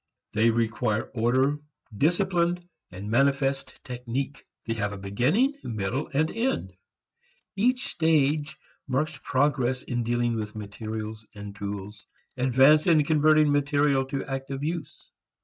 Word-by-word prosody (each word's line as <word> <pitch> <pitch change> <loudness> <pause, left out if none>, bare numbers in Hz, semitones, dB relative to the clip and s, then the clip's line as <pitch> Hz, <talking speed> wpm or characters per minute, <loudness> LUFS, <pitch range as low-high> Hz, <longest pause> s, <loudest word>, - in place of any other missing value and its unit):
They 110 +2 +3
require 115 -1 0
order, 130 +5 +2 0.4
discipline, 175 - +1 0.2
and 100 +4 -7
manifest 135 +2 +1
technique. 125 +3 -4 0.2
They 115 - -1
have 105 -2 -2
a - - -6
beginning, 135 - +1
middle 115 +5 -3
and 155 +3 +1
end. 250 +4 -1 0.8
Each 250 +6 +2
stage 155 -2 +1 0.3
marks 140 +2 -1
progress 130 -2 +1
in 120 -1 -2
dealing 120 0 0
with 105 -1 -5
materials 110 +1 -6
and 100 -1 -8
tools, 100 +1 -6 0.3
advance 130 +5 +5
in 160 -3 +5
converting 155 -1 +4
material 145 -1 +2
to 135 0 -4
active 135 +1 -4
use. 155 -2 -5
135 Hz, 120 wpm, -26 LUFS, 115-150 Hz, 0.8 s, advance